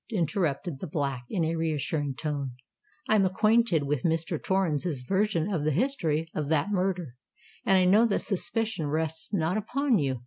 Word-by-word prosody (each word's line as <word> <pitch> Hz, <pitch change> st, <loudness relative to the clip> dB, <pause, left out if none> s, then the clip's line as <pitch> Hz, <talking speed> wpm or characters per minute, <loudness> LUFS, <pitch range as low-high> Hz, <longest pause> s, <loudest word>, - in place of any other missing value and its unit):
interrupted 170 Hz, -, -1 dB
the 185 Hz, -, -5 dB
Black, 140 Hz, -5 st, -2 dB
in 170 Hz, -5 st, 0 dB
a 165 Hz, +1 st, -1 dB
reassuring 150 Hz, -3 st, -1 dB
tone. 140 Hz, -3 st, -3 dB, 0.5 s
"I -, -, +3 dB
am 210 Hz, -2 st, +5 dB
acquainted 215 Hz, -2 st, +3 dB
with 140 Hz, -2 st, -1 dB
Mr. 165 Hz, +1 st, -1 dB
Torrens' 170 Hz, -7 st, 0 dB
version 195 Hz, -1 st, +1 dB
of 160 Hz, -5 st, -1 dB
the 155 Hz, -, +2 dB
history 165 Hz, -, 0 dB
of 150 Hz, -2 st, -3 dB
that 160 Hz, +5 st, +1 dB
murder—and 185 Hz, -1 st, -2 dB
I 185 Hz, -, +4 dB
know 210 Hz, +6 st, +5 dB
that 205 Hz, -, 0 dB
suspicion 220 Hz, -3 st, -1 dB
rests 160 Hz, +1 st, -2 dB
not 180 Hz, 0 st, 0 dB
upon 250 Hz, +2 st, +1 dB
you. 135 Hz, -4 st, -1 dB
165 Hz, 165 wpm, -28 LUFS, 150-195 Hz, 0.5 s, am